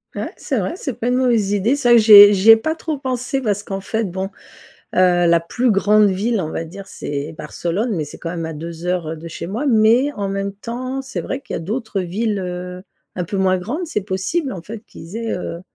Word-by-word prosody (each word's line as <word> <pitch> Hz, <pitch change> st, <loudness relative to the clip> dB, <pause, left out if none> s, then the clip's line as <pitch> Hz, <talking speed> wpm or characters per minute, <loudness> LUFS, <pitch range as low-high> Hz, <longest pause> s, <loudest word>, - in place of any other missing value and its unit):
Ouais, -, -, -4 dB
c'est -, -, -2 dB
vrai. -, -, -1 dB
C'est 270 Hz, -8 st, -4 dB
pas 235 Hz, +2 st, -3 dB
une 250 Hz, -, +2 dB
mauvaise 235 Hz, -6 st, +2 dB
idée. 205 Hz, +6 st, +2 dB
C'est 275 Hz, -4 st, 0 dB
vrai 240 Hz, -, +8 dB
que -, -, +6 dB
j'y 215 Hz, 0 st, +7 dB
ai 205 Hz, 0 st, +11 dB
j'y 200 Hz, +3 st, +3 dB
ai -, -, +10 dB
pas 315 Hz, +8 st, -2 dB
trop 315 Hz, -2 st, -4 dB
pensé 260 Hz, 0 st, -2 dB
parce 205 Hz, -4 st, -1 dB
qu'en 195 Hz, -1 st, -5 dB
fait 220 Hz, +3 st, -2 dB
bon, 190 Hz, 0 st, -3 dB, 0.7 s
heu, -, -, +3 dB, 0.3 s
la 170 Hz, 0 st, +5 dB
plus 240 Hz, +9 st, 0 dB
grande 210 Hz, +1 st, +4 dB
ville 210 Hz, +4 st, 0 dB
on 160 Hz, -4 st, -3 dB
va 165 Hz, -, -4 dB
dire 195 Hz, +4 st, -10 dB
c'est 145 Hz, +2 st, -5 dB
Barcelone 170 Hz, +8 st, -3 dB
mais 155 Hz, -3 st, -2 dB
c'est 145 Hz, -, -11 dB
quand 165 Hz, -, -5 dB
même 165 Hz, -1 st, -4 dB
à 160 Hz, -, -5 dB
2 165 Hz, +2 st, -7 dB
heures, 180 Hz, -2 st, -1 dB
heu, 160 Hz, -, -4 dB
de 165 Hz, +2 st, -9 dB
chez 165 Hz, -, -7 dB
moi. 225 Hz, +10 st, -3 dB
Mais 235 Hz, +3 st, +4 dB
en 200 Hz, -5 st, -3 dB
même 195 Hz, 0 st, -3 dB
temps, 250 Hz, +6 st, -5 dB
c'est 265 Hz, -, -6 dB
vrai 270 Hz, -, -4 dB
qu'il -, -, -6 dB
y -, -, -1 dB
a -, -, -5 dB
d'autres 215 Hz, +4 st, -3 dB
villes, 205 Hz, +4 st, -2 dB
heu, 180 Hz, 0 st, -6 dB, 0.3 s
un 180 Hz, -, -2 dB
peu 195 Hz, +4 st, -4 dB
moins 190 Hz, -1 st, +2 dB
grandes. 275 Hz, -, -4 dB
C'est 255 Hz, -9 st, -2 dB
possible 205 Hz, -, -2 dB
en 185 Hz, -, -7 dB
fait 220 Hz, +6 st, -8 dB
qu'ils 170 Hz, +7 st, -10 dB
aient, 230 Hz, -1 st, -3 dB
heu, 170 Hz, -1 st, -5 dB
205 Hz, 250 wpm, -19 LUFS, 180-240 Hz, 0.7 s, ai